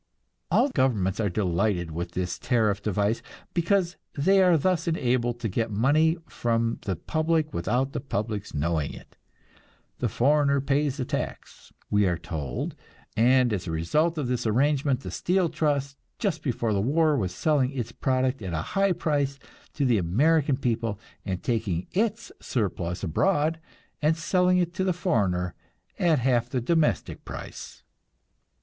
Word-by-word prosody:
All 285 - +3
governments 110 - +1
are 105 -2 +1
delighted 90 -2 0
with 85 +2 -5
this 90 0 -3
tariff 110 -5 +1
device, 105 +2 0 0.3
because 175 +1 +1 0.2
they 190 +7 +4
are 180 -3 +5
thus 180 +2 0
enabled 120 -6 0
to 115 - 0
get 110 +3 -1
money 150 +10 +3
from 115 -1 -1
the 95 -3 -1
public 155 - 0
without 125 +10 0
the - - -2
public's 105 -5 -3
knowing 75 0 -1
it. - - -15 0.8
"The - - 0
foreigner 140 +2 +3
pays 140 +1 0
the 130 - -2
tax," - - -5 0.2
we 105 -1 +4
are 85 -2 0
told, 80 -6 -4 0.4
and 125 +1 +4
as 95 -3 -3
a - - -2
result 150 - +1
of 145 -4 -1
this 125 -2 -1
arrangement 135 +3 +2
the - - -6
steel 180 -1 +1
trust 140 -3 -1 0.2
just 180 -8 -1
before 120 -5 -1
the 100 - +1
war 155 +6 +3
was 95 -9 -1
selling 135 - +1
its 130 -4 -4
product 130 -1 0
at 95 -4 -4
a 80 - -1
high 195 -1 +3
price 145 -4 0 0.4
to 145 - +1
the 120 -5 +3
American 140 - +2
people, 115 -5 -1 0.2
and 95 -3 -4
taking 105 -7 -1
its 220 +3 -1
surplus 90 -7 -2
abroad 155 - +1 0.4
and 155 +2 +2
selling 180 +2 +2
it 175 -1 0
to 190 +1 -1
the 185 -1 +1
foreigner 100 - 0 0.5
at 165 -3 +3
half 125 -2 +1
the 130 - -1
domestic 150 - 0
price. - - -9
130 Hz, 155 wpm, -26 LUFS, 105-155 Hz, 0.8 s, are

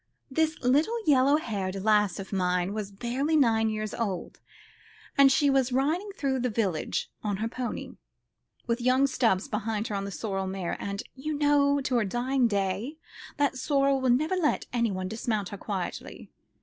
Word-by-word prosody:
This 315 +2 +1
little 295 - +3
yellow 275 0 +5
haired 200 -9 -3
lass 210 -3 +3
of 195 0 -7
mine 180 0 0
was 210 -2 -4
barely 250 +9 -1
nine 225 -6 +3
years 215 -1 -3
old, 200 -6 -3 0.8
and 275 -1 +7
she 285 +2 +3
was 270 -2 +2
riding 310 +10 0
through 265 -2 0
the 250 0 0
village 200 -8 -1
on 205 -2 -1
her 220 +3 -1
pony, 245 +1 -5 0.7
with 235 0 -1
young 255 +2 +4
Stubbs 225 -7 +1
behind 220 -2 -2
her 210 - -2
on 195 0 -2
the - - -4
sorrel 195 -1 -3
mare 190 -2 -3
and, 200 0 -4
you 300 +3 -4
know, 285 -1 +3
to 260 -2 0
her 235 - +2
dying 245 +4 +1
day, 200 +7 -2 0.4
that 285 -2 +1
sorrel 275 -1 +2
would 255 -2 +4
never 310 +6 -1
let 335 -5 +1
anyone 205 -6 0
dismount 215 -2 -2
her 200 - -7
quietly. 195 -2 -5
235 Hz, 170 wpm, -28 LUFS, 200-275 Hz, 0.8 s, and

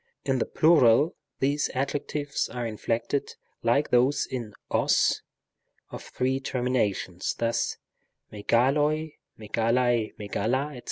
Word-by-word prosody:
In 135 -2 +1
the - - -1
plural 155 -2 +4 0.2
these 145 +2 +1
adjectives 145 +2 -2
are 120 -1 -4
inflected 115 +4 -2 0.3
like 140 +6 +1
those 125 +4 +3
in 115 -5 -6 0.2
os - - +2 0.7
of - - -7
three 130 +1 -1
terminations, 120 -9 -1
thus: 115 0 -1 0.6
μεγάλοι, 145 +8 +1 0.3
at, 115 +3 +1
a, 120 -3 +1
etc. 125 +7 -2
125 Hz, 105 wpm, -27 LUFS, 115-140 Hz, 0.7 s, plural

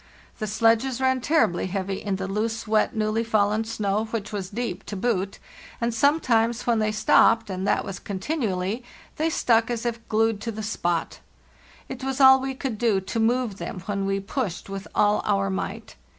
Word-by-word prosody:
The 215 - -2
sledges 230 +4 +2
ran 260 -1 +2
terribly 225 - +2
heavy 195 0 -3
in 200 -2 -1
the 190 0 -4
loose, 220 +3 -2
wet, 215 +3 +2
newly 215 +1 0
fallen 215 -1 +1
snow, 215 -1 -1
which 220 -2 -4
was 195 -3 -4
deep 215 -3 -4
to 210 - -5
boot; 195 -2 -1 0.4
and 235 0 0
sometimes 235 -3 +2
when 235 -2 +2
they 215 0 +1
stopped 220 0 +4
—and 190 +1 -3
that - - +1
was 195 - -6
continually—they 220 - -3
stuck 230 -7 +2
as 235 -1 -3
if 235 -1 -3
glued 220 -1 +1
to 230 - -3
the 220 0 -6
spot. 175 -6 -2 0.7
It 260 0 -7
was 265 0 -2
all 265 -1 +8
we 265 0 -3
could 255 -5 -4
do 225 -5 +2
to 190 +4 -4
move 230 -2 +1
them 180 - -5
when 195 -1 -2
we 195 0 0
pushed 195 - -4
with 195 0 -6
all 210 0 +3
our 100 0 +1
might. 95 - -5
220 Hz, 180 wpm, -25 LUFS, 195-235 Hz, 0.7 s, all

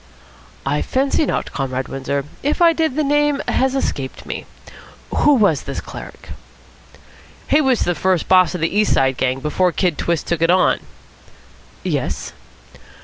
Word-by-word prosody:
"I 145 +2 0
fancy 275 +3 0
not, - - -2
Comrade 130 -2 -3
Windsor. 135 +1 -3 0.2
If 290 +2 -1
I 340 -1 +6
did, 320 -5 0
the 310 - +1
name 295 0 +2
has 265 0 +1
escaped 135 - -3
me. - - -6 0.7
Who 295 - +5
was 200 - +3
this - - -5
cleric?" - - -10 1.2
"He 300 - +4
was 265 -4 +2
the 175 - +1
first 185 0 0
boss 185 -1 +4
of 175 - -4
the 165 +4 -1
East 210 0 +3
Side 135 -1 +2
gang, 130 0 0
before 175 +5 +1
Kid 175 -3 0
Twist 170 -2 -1
took 170 -2 -2
it 165 - +3
on." 185 +1 +3 1.0
"Yes?" - - -3
185 Hz, 155 wpm, -19 LUFS, -, 1.2 s, I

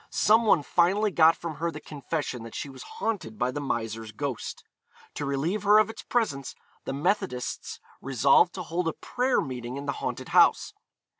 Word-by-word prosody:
Some 220 +2 +4
one 160 -7 +4
finally 195 +7 +2
got 165 -2 +5
from 165 -3 -6
her 170 +1 -1
the 150 -2 -7
confession 145 -4 -4
that 115 0 -9
she 140 - -4
was 135 - -11
haunted 220 - -4
by 125 +3 0
the 145 - -4
miser's 115 -4 -3
ghost. 135 +1 -5 0.5
To 145 - -4
relieve 155 +9 -1
her 205 +1 +6
of 215 +1 +3
its - - -10
presence 145 - -1 0.3
the - - -3
Methodists 145 -3 -2 0.2
resolved 135 +6 +3
to 185 - -4
hold 170 +1 -2
a 165 - 0
prayer 255 +1 0
meeting 125 -1 -5
in 140 - -6
the 140 - 0
haunted - - -4
house. - - +4
150 Hz, 180 wpm, -27 LUFS, 130-195 Hz, 0.5 s, her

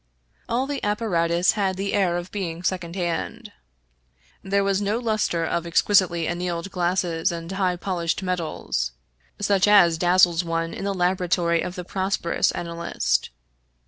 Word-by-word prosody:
All 245 +3 +1
the 285 0 -4
apparatus 180 -5 +1
had 195 -3 -1
the 200 +1 -2
air 185 -4 +2
of 175 +1 -6
being 175 -4 -4
second 180 -2 -2
hand. 195 +5 -3 0.9
There 200 +1 +1
was 195 0 +1
no 205 +2 0
luster 215 -8 0
of 170 +1 -2
ex 170 - +3
quisitely 180 -5 +3
annealed 175 +1 -3
glass 180 0 +1
and 165 0 -2
highly 185 -2 0
polished 175 -1 -2
metals, 160 - -2 0.5
such 200 -1 +2
as 175 -6 +6
dazzles 175 -1 +4
one 165 0 -2
in - - -5
the 200 -1 -1
laboratory 180 -2 +1
of 180 - -4
the 180 -2 -6
prosperous 190 -2 0
analyst. 170 0 -1
180 Hz, 145 wpm, -24 LUFS, 170-195 Hz, 0.9 s, as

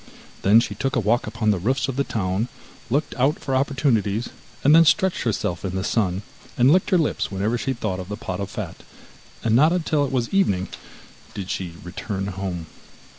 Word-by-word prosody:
Then 105 +4 +6
she 115 - -2
took 135 - -2
a - - +3
walk 115 +2 +1
upon 110 0 +1
the 100 - 0
roofs 130 +9 0
of 135 - -3
the 140 - +1
town, 100 -1 -1 0.4
looked 145 +6 0
out 140 +5 +3
for 135 - -2
opportunities, 130 -6 +1 0.3
and 145 - +6
then 165 +1 +8
stretched 185 +3 +3
herself 100 -7 -1
in 95 -1 -3
the 95 - -1
sun, 100 -3 0 0.3
and 125 +3 +5
licked 185 +4 +3
her 185 - +4
lips 160 -4 0
whenever 100 +4 0
she 130 +2 -1
thought 110 -6 -3
of 90 0 -7
the 105 - -4
pot 90 -4 -5
of 100 -1 -3
fat, - - -6 0.6
and 115 -1 +2
not 150 +6 +6
until 160 -4 +1
it 140 - -2
was 125 -3 0
evening 100 - +2 0.7
did 95 -2 -4
she 90 -3 -4
return 95 +2 -4
home. 95 -3 -4
115 Hz, 200 wpm, -23 LUFS, 95-135 Hz, 0.7 s, then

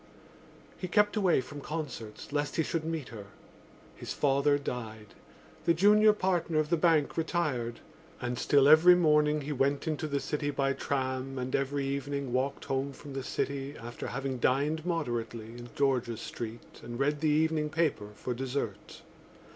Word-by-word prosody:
He 185 - -3
kept 210 +3 +3
away 190 -9 +3
from 145 +3 -9
concerts 140 -10 -6
lest 145 0 -1
he 160 - +2
should 160 +1 -2
meet 160 -4 -4
her. 105 -4 -9 0.7
His - - -6
father 145 0 +3
died; 110 -6 -6 0.5
the 170 - +4
junior 210 +4 +6
partner 180 -5 0
of 155 +1 +1
the - - +5
bank 160 -3 +2
retired. 150 -8 -1 0.4
And 120 0 -3
still 140 +1 +4
every 160 +4 +8
morning 150 -3 +3
he 145 +2 -5
went 140 +2 0
into 155 0 -1
the 140 -1 -1
city 145 +1 -2
by 135 -1 0
tram 130 -1 -2
and 130 0 -2
every 140 0 -1
evening 140 -1 -3
walked 135 +2 -1
home 135 +1 -1
from 140 +1 -10
the 135 - -3
city 140 +2 -3
after 120 +1 -7
having 135 0 -3
dined 150 +7 +1
moderately 120 -9 -2
in 120 0 -9
George's 125 -5 0
Street 115 0 -8
and 120 +1 -7
read 145 +2 +1
the 155 - +2
evening 155 0 +2
paper 155 -10 0
for 125 +4 -4
dessert. 125 -4 -4
140 Hz, 165 wpm, -30 LUFS, 130-155 Hz, 0.7 s, every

